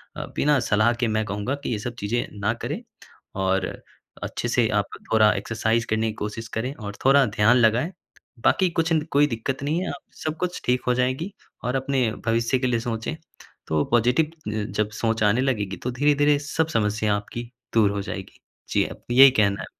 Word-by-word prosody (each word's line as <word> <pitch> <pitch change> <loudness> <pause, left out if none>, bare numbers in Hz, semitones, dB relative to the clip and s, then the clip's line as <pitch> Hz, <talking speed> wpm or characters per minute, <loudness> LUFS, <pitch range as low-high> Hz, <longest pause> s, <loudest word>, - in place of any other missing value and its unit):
अ, - - -4
बिना 145 -2 +3
सलाह 110 +1 +2
के 120 0 -1
मैं 110 0 0
कहूँगा 105 +6 -2
कि - - -2
ये 110 - -1
सब 120 +3 -5
चीज़ें 115 +4 -1
ना 100 +2 +1
करें। 120 - -5 0.5
और 95 -1 +1 0.6
अच्छे - - -3
से - - +2
आप - - -1 0.3
थोड़ा 110 -1 +6
एक्सरसाइज़ 110 +2 0
करने 110 +1 +1
की 110 - -2
कोशिश 110 +2 -5
करें 125 +5 -2
और 100 -4 -7
थोड़ा 135 0 +6
ध्यान 105 +2 +3
लगाएँ। 120 +7 +3 0.5
बाकी 185 - +3
कुछ 165 -1 -1
अंद 155 -2 +1
कोई 145 +1 +4
दिक्कत 130 +2 -3
नहीं 155 +4 0
है। 190 - -3
आप 180 - -6 0.2
सब 155 0 -2
कुछ 180 +1 -3
ठीक 125 +1 +2
हो 125 - +4
जाएगी 130 +9 -1 0.3
और 125 +2 -1
अपने 130 -3 +1 0.2
भविष्य 115 +3 +1
के 130 - 0
लिए 120 -2 +1
सोचे। 115 +6 -3 0.5
तो 75 -1 +1
पॉजिटिव 125 +7 +3 0.3
जब 105 0 -1
सोच 110 -1 +1
आने 105 +4 +3
लगेगी 105 -8 -1
तो 125 - -1
धीरे-धीरे 145 +2 +3
सब 155 +2 -1
समस्या 105 -6 +1
आपकी 115 +3 -6 0.2
दूर 110 -3 +4
हो 100 0 -2
जाएगी। 100 -1 -7 0.3
जी, - - +2
आप - - -7
कि 120 - -1
यही 135 0 +10
कहना 100 -5 +2
है। - - -5
120 Hz, 195 wpm, -24 LUFS, 110-135 Hz, 0.6 s, यही